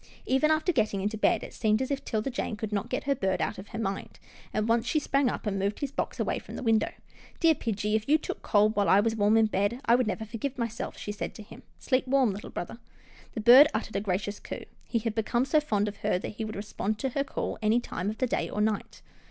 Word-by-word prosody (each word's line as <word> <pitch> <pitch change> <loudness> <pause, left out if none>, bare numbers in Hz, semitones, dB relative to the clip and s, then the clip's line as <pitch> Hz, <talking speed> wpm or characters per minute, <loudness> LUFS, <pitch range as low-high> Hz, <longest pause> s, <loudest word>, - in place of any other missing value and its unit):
Even 265 +4 +3
after 315 +3 +2
getting 215 - 0
into 210 +3 -1
bed, 215 - +2
it - - -9
seemed 215 -1 +1
as 260 +1 -2
if 275 - -2
'Tilda 220 +4 -2
Jane 240 -3 -3
could 210 0 -5
not 210 +3 -1
get 255 - -2
her 280 - +2
bird 190 -7 -1
out - - -2
of 195 - -9
her 225 - -7
mind, 195 -3 -4 0.3
and 215 +1 -1
once 230 +1 +2
she 310 - +1
sprang 275 -2 +1
up - - -5
and 195 -2 -1
moved 200 +2 -1
his 280 -2 -3
box - - -3
away - - 0
from - - -10
the - - -5
window. 225 -2 +2 0.3
" - - -23
Dear 330 -2 +5
pidgie, 210 -6 -2
if 220 +4 -2
you 305 - +6
took 310 - -6
cold 210 +1 +3
while 205 -1 +2
I 195 - +6
was 225 +2 +1
warm 210 +1 +4
in 225 - +5
bed, 210 +3 0
I 235 - +5
would 250 -1 +3
never 220 +1 -2
forgive 240 +5 -4
myself," 235 -1 -4
she 205 - -5
said 205 - -5
to 215 - -9
him. 210 - -13
" - - -38
Sleep 255 -1 0
warm, 260 -4 +3
little 200 +2 -7
brother." 175 +6 -6 0.6
The 220 - -2
bird 250 +6 +9
uttered - - -3
a - - +1
gracious 205 +1 -2
coo. - - -7 0.2
He 235 - 0
had 225 -1 -1
become 235 +3 0
so 290 +3 +3
fond 210 -8 0
of 205 -1 -5
her - - 0
that - - -5
he 220 +1 -5
would 215 - -6
respond 210 +1 -3
to 265 - -1
her 275 +2 -1
call 280 - -4
any 220 +2 +3
time 200 -4 -4
of 215 - -5
day 255 -2 0
or - - -4
night. 210 -1 -1
220 Hz, 265 wpm, -28 LUFS, 210-255 Hz, 0.6 s, bird